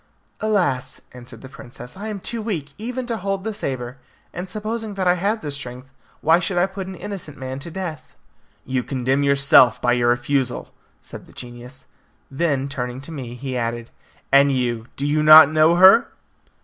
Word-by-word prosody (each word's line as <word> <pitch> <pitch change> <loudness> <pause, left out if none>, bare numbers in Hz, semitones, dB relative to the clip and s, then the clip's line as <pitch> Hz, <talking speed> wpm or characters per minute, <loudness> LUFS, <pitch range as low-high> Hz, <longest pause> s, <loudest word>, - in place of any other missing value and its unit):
"Alas," 175 -12 -1
answered 125 -2 -12
the 130 - -10
princess, 125 -2 -12
"I 205 +3 -7
am 210 -2 -5
too 230 +4 -4
weak 165 -11 -4
even 250 +3 -4
to 235 -2 -3
hold 195 -1 -3
the 220 0 -3
sabre. 130 -7 -5 0.3
And 180 +1 -6
supposing 215 +1 -5
that 190 -2 -1
I 180 - +5
had 200 +5 -1
the 145 - -4
strength, 130 -1 -7 0.3
why 165 +3 +4
should 180 +1 -2
I 175 - +4
put 190 -1 -7
an 190 - -7
innocent 180 -6 -8
man 130 0 -6
to 165 +5 -8
death?" 170 -3 -7 0.5
"You 130 -1 -1
condemn 130 +1 -1
yourself 140 -4 +5
by 125 - +1
your 120 -1 +2
refusal," 130 +1 -1 0.3
said - - -12
the - - -18
genius; 125 +2 -10 0.5
then 140 -2 -1
turning 125 -3 -5
to 145 - -9
me, 125 -6 -7
he 130 +1 -6
added, 120 -1 -3 0.4
"and 140 +1 +5
you, 120 -3 -2
do 140 - -3
you 150 +1 +1
not 155 -1 +9
know 155 +2 +4
her?" 190 +6 +7
140 Hz, 185 wpm, -21 LUFS, 130-190 Hz, 0.5 s, not